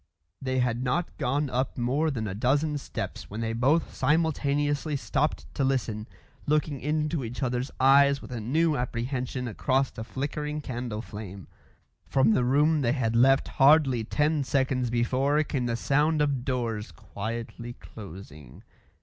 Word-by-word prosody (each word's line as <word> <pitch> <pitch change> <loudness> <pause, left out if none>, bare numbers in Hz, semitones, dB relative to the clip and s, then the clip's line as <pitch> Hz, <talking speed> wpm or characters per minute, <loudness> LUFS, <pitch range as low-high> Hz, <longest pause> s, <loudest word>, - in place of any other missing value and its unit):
They 130 -1 -1
had 125 -1 +1
not 160 +7 -1
gone 140 +4 0
up 130 +1 -1
more 135 +6 +1
than 115 -7 -3
a 95 - -3
dozen 145 +7 +1
steps - - -6
when 105 - -6
they 115 0 -2
both 135 +8 +2
simultaneously 145 0 +1
stopped 145 +2 -1
to 140 - -1
listen, 120 -5 -1 0.4
looking 150 -2 0
into 150 0 -1
each 120 +3 -5
other's 125 +1 -1
eyes 140 +1 +5
with - - -11
a 120 -3 -4
new 155 +7 +2
apprehension 125 +1 -3
across 130 +4 0
the 110 - -7
flickering 150 +4 -4
candle 120 -5 -4
flame. 100 -3 -9 0.6
From 130 -4 +3
the 125 - +2
room 145 +5 +3
they 120 -2 +2
had 115 -5 0
left 135 +3 +4
hardly 135 -4 +5
ten 150 +5 +1
seconds 130 -2 0
before 130 +5 +1
came 130 -4 -2
the 120 - 0
sound 150 +6 +2
of 140 -4 +1
doors 115 -5 -2
quietly 115 +3 -6
closing. 90 - -12
130 Hz, 150 wpm, -27 LUFS, 120-145 Hz, 0.6 s, eyes